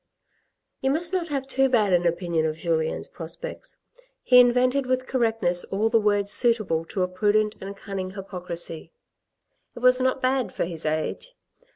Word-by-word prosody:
You 265 - +1
must 335 +5 0
not 360 -3 0
have 275 -3 -3
too 270 0 +1
bad 215 -6 +2
an 175 0 +3
opinion 170 -1 0
of 155 0 -4
Julien's 160 - -1
prospects. - - -9 0.5
He 250 -1 +7
invented 250 +2 +3
with 255 0 0
correctness 225 -9 0
all 210 +3 0
the 225 0 +4
words 205 -1 +1
suitable 215 -9 +1
to 185 +2 -2
a - - +1
prudent 210 +3 +1
and 195 +1 -7
cunning 195 -3 -5
hypocrisy. 180 -4 -6 0.8
It - - -8
was 250 0 +5
not 260 +1 +1
bad 260 -1 0
for - - -2
his 165 -2 -5
age. 155 - -3
210 Hz, 165 wpm, -25 LUFS, 180-255 Hz, 0.8 s, He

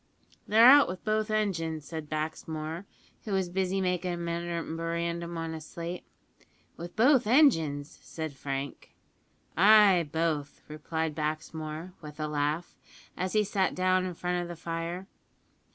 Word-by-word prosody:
"They're 225 +2 +6
out 280 +3 +9
wi' 185 - -3
both 215 +3 -1
engines," 165 -8 -1
said 160 -2 -7
Baxmore, 155 +2 -4 0.4
who 210 - -4
was 190 -2 0
busy 190 +1 0
making 180 -1 -1
a - - -4
memorandum 170 0 -3
on 165 0 -4
a 160 - -6
slate. 170 +3 -7 0.7
"With 175 +1 -9
both 250 +1 +4
engines!" 165 - +3
said 160 -2 -6
Frank. 135 0 -6 0.6
"Ay, 195 -4 +6
both," 160 -3 -2
replied 155 +1 -3
Baxmore, 155 +2 -4
with 150 -1 -10
a 155 - -1
laugh, 150 +3 -1 0.4
as 185 0 -3
he 215 -1 +4
sat 195 -2 0
down 185 0 +2
in 180 -2 -5
front 180 +1 -1
of 175 - -5
the 175 - -7
fire. 170 +2 -4
170 Hz, 140 wpm, -29 LUFS, 155-185 Hz, 0.7 s, out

